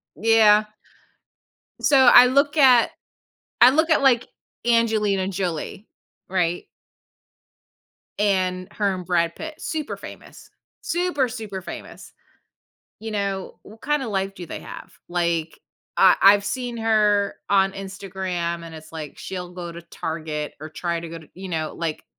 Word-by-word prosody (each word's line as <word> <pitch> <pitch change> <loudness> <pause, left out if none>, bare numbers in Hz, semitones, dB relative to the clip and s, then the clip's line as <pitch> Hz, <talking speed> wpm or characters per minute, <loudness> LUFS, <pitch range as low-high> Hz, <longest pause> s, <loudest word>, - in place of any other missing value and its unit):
Yeah. 215 +1 +5 1.2
So, 280 - +4
I 245 +1 +9
look 280 +4 +2
at 255 -4 +6 0.7
I 245 +2 +9
look 315 +4 +2
at, 315 - +3
like, 250 -3 +4 0.4
Angelina 215 -5 +2
Jolie, 185 +1 -4 0.4
right? 175 -2 0 1.5
And 185 -3 0
her 200 -2 0
and 180 -1 -6
Brad 170 -2 +1
Pitt, 315 -1 -7
super 310 -2 -4
famous. - - -12 0.3
Super, 345 -7 0
super 215 -5 -6
famous, - - -10 0.9
you 225 0 -6
know, 200 -2 -3
what 220 +2 -15
kind 295 -1 0
of 230 - -4
life 195 0 -2
do 180 - -8
they - - -7
have? - - -10 0.2
Like, 170 -2 -1 0.4
I 185 -2 +7
I've 200 +1 +7
seen 245 +1 -3
her 210 -3 +2
on 195 -1 +3
Instagram, 190 -3 -4
and 165 -1 -10
it's 160 +1 -12
like 155 -3 -7
she'll 180 -2 -6
go 175 -2 -6
to 170 - -9
Target 155 -3 -5
or 155 - -7
try 170 +1 -3
to 170 - -7
go 165 0 -8
to 155 - -16
you 190 +1 -8
know, 160 -2 -3
like, 165 -2 -4
195 Hz, 145 wpm, -23 LUFS, 170-225 Hz, 1.5 s, I